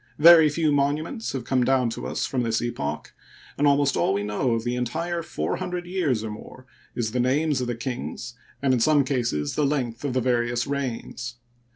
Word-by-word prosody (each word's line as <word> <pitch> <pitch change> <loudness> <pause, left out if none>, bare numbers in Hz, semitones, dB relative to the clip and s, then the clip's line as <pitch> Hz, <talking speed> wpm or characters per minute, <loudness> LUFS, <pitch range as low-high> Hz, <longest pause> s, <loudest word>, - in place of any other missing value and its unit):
Very 160 0 +8
few 155 +1 +1
monuments 150 - 0
have 130 -3 -3
come 125 0 +1
down 130 -2 +2
to - - -5
us - - -2
from 130 - -1
this 115 -2 0
epoch, 75 -11 -4 0.4
and 145 - +2
almost 140 0 +3
all 95 - +2
we 100 - -1
know 105 +4 0
of 115 - -2
the 120 +1 -1
entire 165 +8 -2
four 165 - -3
hundred 180 -1 -4
years 165 - 0
or 110 - -4
more 130 +4 -11 0.3
is 115 -3 -1
the 125 - -1
names 140 +3 +1
of 125 - -2
the 120 - -2
kings 120 -1 -5 0.3
and 135 -2 +3
in 125 - +2
some 145 +4 +4
cases 120 - -1
the 150 - 0
length 130 -5 -1
of 140 -3 -1
the 130 - +2
various 120 -1 +1
reigns. 125 -2 -4
130 Hz, 205 wpm, -25 LUFS, 120-145 Hz, 0.4 s, Very